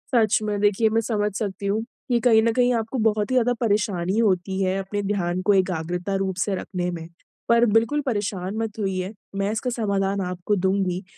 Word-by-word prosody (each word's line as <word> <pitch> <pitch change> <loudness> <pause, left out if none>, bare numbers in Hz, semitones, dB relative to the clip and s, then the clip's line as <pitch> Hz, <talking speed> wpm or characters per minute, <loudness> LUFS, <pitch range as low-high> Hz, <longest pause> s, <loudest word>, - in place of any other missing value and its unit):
सच 220 -3 +4
में 205 -1 -1
देखिए 210 +2 +3
मैं 225 +1 +2
समझ 210 -2 -1
सकती 200 -2 -4
हूँ 210 +3 0 0.3
कि 240 -1 +3
कहीं 225 -2 +5
न 230 - +3
कहीं 245 0 +3
आपको 230 +3 -2
बहुत 215 +1 +1
ही - - +1
ज़्यादा 245 0 +3
परेशानी 205 -3 0
होती 190 -2 +1
है 190 0 +1
अपने 205 +2 -3
ध्यान 180 -2 -1
को 205 - +6
एकाग्रता 180 0 -1
रूप 190 -1 -1
से 200 -2 -1
रखने 180 -1 -3
में। 165 -1 -6 0.4
पर 235 +1 +5
बिल्कुल 230 +7 +2
परेशान 205 -4 -2
मत 225 -1 -3
होइए 190 0 -2 0.2
मैं 195 +1 0
इसका 235 +3 -2
समाधान 200 -4 0
आपको 180 +3 -1
दूँगी। 190 0 0
205 Hz, 195 wpm, -24 LUFS, 190-225 Hz, 0.4 s, को